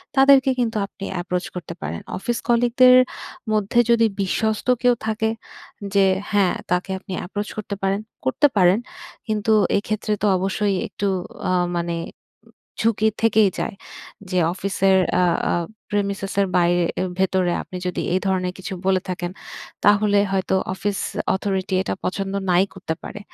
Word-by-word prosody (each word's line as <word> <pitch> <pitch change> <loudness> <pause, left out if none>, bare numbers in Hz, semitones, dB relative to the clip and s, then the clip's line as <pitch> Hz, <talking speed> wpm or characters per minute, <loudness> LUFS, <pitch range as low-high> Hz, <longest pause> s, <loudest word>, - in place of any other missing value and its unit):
তাদেরকে 270 -1 +6
কিন্তু 225 -2 0
আপনি 205 - -12 0.2
এপ্রোচ 180 0 -2
করতে 180 - -6
পারেন। 75 +2 -4 0.2
অফিস 235 +5 -2
কলিগদের 245 +1 +5 0.6
মধ্যে 215 +2 +2
যদি 230 -1 +5 0.2
বিশ্বস্ত 215 +4 -1
কেউ 245 -1 +5
থাকে, 220 0 0 0.6
যে 200 - +4 0.3
হ্যাঁ, 200 -3 +3 0.2
তাকে 180 +2 0
আপনি 190 - -8
এপ্রোচ 205 +2 -4
করতে 210 -1 -4
পারেন, 195 +1 +1 0.3
করতে 130 - +4
পারেন। 180 +1 +5 0.5
কিন্তু 215 0 0 0.3
এক্ষেত্রে 215 +1 -2
তো - - +1
অবশ্যই, 195 +2 0
একটু 205 - -5 0.4
আ - - +2 0.3
মানে 170 0 -2 0.9
ঝুঁকি 220 -1 +2
থেকেই 220 -3 +4
যায়। 220 - -3 0.5
যে 185 - -1 0.2
অফিসের 190 0 +2 0.2
আ - - +4 0.3
আ - - +1 0.4
প্রেমিসেস 200 -2 -2
এর - - +3
বাইরে 175 0 +3 0.2
এ - - +1 0.2
ভেতরে 185 -1 +2
আপনি 185 - -8
যদি 180 - -2
এই 185 - +3
ধরনের 185 -1 0
কিছু 190 0 -6
বলে 190 -1 +3
থাকেন, 175 -1 -3 0.5
তাহলে 205 0 +4
হয়তো 190 0 0 0.2
অফিস 200 +1 -2 0.4
অথরিটি 190 -1 -2
এটা - - -2
পছন্দ 195 +1 -2 0.2
নাই 180 +1 +5
করতে 185 -4 -4
পারে। - - -7
195 Hz, 145 wpm, -22 LUFS, 185-215 Hz, 0.9 s, তাদেরকে